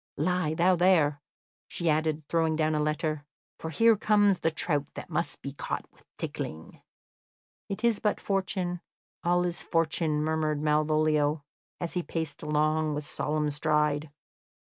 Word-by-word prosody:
Lie 160 Hz, 0 st, 0 dB
thou 180 Hz, +3 st, +4 dB
there," 165 Hz, -5 st, +3 dB, 0.5 s
she 170 Hz, -, -4 dB
added, 155 Hz, 0 st, +1 dB
throwing 160 Hz, -1 st, +1 dB
down 155 Hz, 0 st, +1 dB
a 150 Hz, -, +1 dB
letter, 150 Hz, 0 st, -1 dB, 0.4 s
"for 160 Hz, -, -4 dB
here 225 Hz, +8 st, +5 dB
comes 205 Hz, -2 st, +3 dB
the 165 Hz, -, +2 dB
trout 150 Hz, -3 st, -1 dB
that -, -, -8 dB
must -, -, -2 dB
be -, -, -5 dB
caught -, -, -4 dB
with -, -, -25 dB
tickling." -, -, -6 dB, 0.9 s
"It 200 Hz, +3 st, -4 dB
is 235 Hz, -3 st, +3 dB
but 210 Hz, -, 0 dB
fortune 185 Hz, -3 st, -1 dB, 0.4 s
all 175 Hz, +1 st, +3 dB
is 175 Hz, -1 st, -2 dB
fortune," 160 Hz, -2 st, 0 dB
murmured 155 Hz, -1 st, 0 dB
Malvolio, 150 Hz, 0 st, +2 dB, 0.4 s
as 170 Hz, -, -3 dB
he 180 Hz, -, 0 dB
paced 160 Hz, -3 st, -4 dB
along 155 Hz, 0 st, +1 dB
with 150 Hz, 0 st, -3 dB
solemn 150 Hz, 0 st, -1 dB
stride. 150 Hz, 0 st, +1 dB
155 Hz, 145 wpm, -28 LUFS, 150-175 Hz, 0.9 s, here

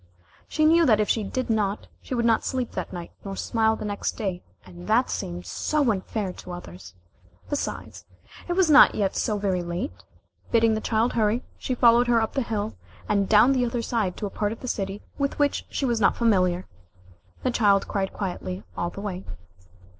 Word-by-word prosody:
She 310 Hz, -, +1 dB
knew 335 Hz, +2 st, +6 dB
that 215 Hz, -3 st, +5 dB
if 210 Hz, -, +2 dB
she 220 Hz, -, +1 dB
did 255 Hz, +6 st, -3 dB
not, 210 Hz, -2 st, 0 dB, 0.2 s
she 255 Hz, -, -4 dB
would 235 Hz, -1 st, 0 dB
not 225 Hz, -1 st, +3 dB
sleep 255 Hz, -3 st, -2 dB
that -, -, -5 dB
night, 175 Hz, -2 st, -7 dB
nor 195 Hz, -1 st, -5 dB
smile 220 Hz, +1 st, +1 dB
the 215 Hz, -, -6 dB
next 205 Hz, -1 st, -2 dB
day 190 Hz, -5 st, -3 dB, 0.2 s
and 90 Hz, -1 st, -11 dB
that -, -, +3 dB
seemed 90 Hz, 0 st, -4 dB
so 280 Hz, -, +1 dB
unfair 195 Hz, -1 st, -3 dB
to 180 Hz, -, -9 dB
others. 95 Hz, -, -10 dB, 0.6 s
Besides, 290 Hz, -, -4 dB, 0.4 s
it 350 Hz, -, 0 dB
was 375 Hz, -1 st, +3 dB
not 300 Hz, -2 st, +7 dB
yet 195 Hz, -2 st, 0 dB
so 210 Hz, -, 0 dB
very 195 Hz, -3 st, 0 dB
late. 175 Hz, -, -4 dB, 0.6 s
Bidding 230 Hz, -1 st, +4 dB
the 215 Hz, -, -1 dB
child 225 Hz, +2 st, +1 dB
hurry, 225 Hz, +2 st, +1 dB, 0.2 s
she 255 Hz, -, -2 dB
followed 240 Hz, 0 st, +5 dB
her 235 Hz, -1 st, +4 dB
up 220 Hz, -1 st, -1 dB
the 275 Hz, -, 0 dB
hill, 220 Hz, -2 st, -2 dB, 0.3 s
and 200 Hz, -2 st, +1 dB
down 220 Hz, +5 st, +6 dB
the 255 Hz, -2 st, +2 dB
other 235 Hz, -1 st, -1 dB
side 215 Hz, -7 st, -1 dB
to -, -, -3 dB
a 200 Hz, -, -4 dB
part 205 Hz, -1 st, -1 dB
of 225 Hz, -, -7 dB
the 255 Hz, -, -6 dB
city 195 Hz, -3 st, -3 dB, 0.2 s
with 280 Hz, 0 st, -1 dB
which 290 Hz, -1 st, 0 dB
she 275 Hz, -, -2 dB
was 235 Hz, -3 st, 0 dB
not -, -, +3 dB
familiar. 185 Hz, -6 st, +2 dB, 0.8 s
The 255 Hz, -, +1 dB
child 205 Hz, -4 st, +3 dB
cried 195 Hz, -1 st, -1 dB
quietly 185 Hz, -1 st, -5 dB
all 175 Hz, -, -2 dB
the 195 Hz, -, -8 dB
way. 195 Hz, -2 st, -4 dB
215 Hz, 200 wpm, -25 LUFS, 195-240 Hz, 0.8 s, not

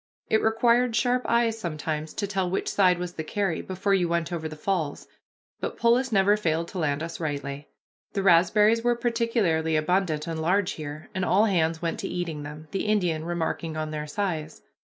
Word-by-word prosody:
It 220 Hz, -, +4 dB
required 235 Hz, +2 st, +3 dB
sharp 245 Hz, +3 st, +1 dB
eyes 230 Hz, -1 st, +2 dB
sometimes 155 Hz, -3 st, -4 dB
to 205 Hz, -, -1 dB
tell 190 Hz, -2 st, -1 dB
which 190 Hz, -, -2 dB
side 185 Hz, -3 st, +3 dB
was 175 Hz, 0 st, -5 dB
the 160 Hz, -, -4 dB
carry, 195 Hz, 0 st, -1 dB
before 190 Hz, +2 st, -1 dB
you 180 Hz, -3 st, +2 dB
went 170 Hz, 0 st, -1 dB
over 160 Hz, -2 st, -3 dB
the 155 Hz, -, -8 dB
falls, 155 Hz, -3 st, -2 dB, 0.5 s
but -, -, -4 dB
Polis 240 Hz, +2 st, +3 dB
never 200 Hz, 0 st, +4 dB
failed 165 Hz, -5 st, -1 dB
to 185 Hz, -, -5 dB
land 145 Hz, -1 st, 0 dB
us 165 Hz, -, -6 dB
rightly. 145 Hz, -2 st, -4 dB, 0.4 s
The 195 Hz, -, -1 dB
raspberries 210 Hz, +5 st, +4 dB
were 240 Hz, 0 st, +3 dB
particularly 230 Hz, -9 st, +1 dB
abundant 155 Hz, -1 st, +1 dB
and 165 Hz, -2 st, -4 dB
large 185 Hz, +4 st, +2 dB
here, 150 Hz, 0 st, -7 dB
and 185 Hz, -, -2 dB
all 200 Hz, +4 st, +4 dB
hands 165 Hz, -5 st, +1 dB
went 165 Hz, -, -2 dB
to -, -, -3 dB
eating 170 Hz, -4 st, -3 dB
them, 150 Hz, +2 st, -9 dB
the 195 Hz, -, -2 dB
Indian 175 Hz, -7 st, +1 dB
remarking 165 Hz, -1 st, -2 dB
on 155 Hz, 0 st, -3 dB
their 150 Hz, 0 st, -4 dB
size. 155 Hz, -3 st, -3 dB
175 Hz, 190 wpm, -26 LUFS, 160-205 Hz, 0.5 s, It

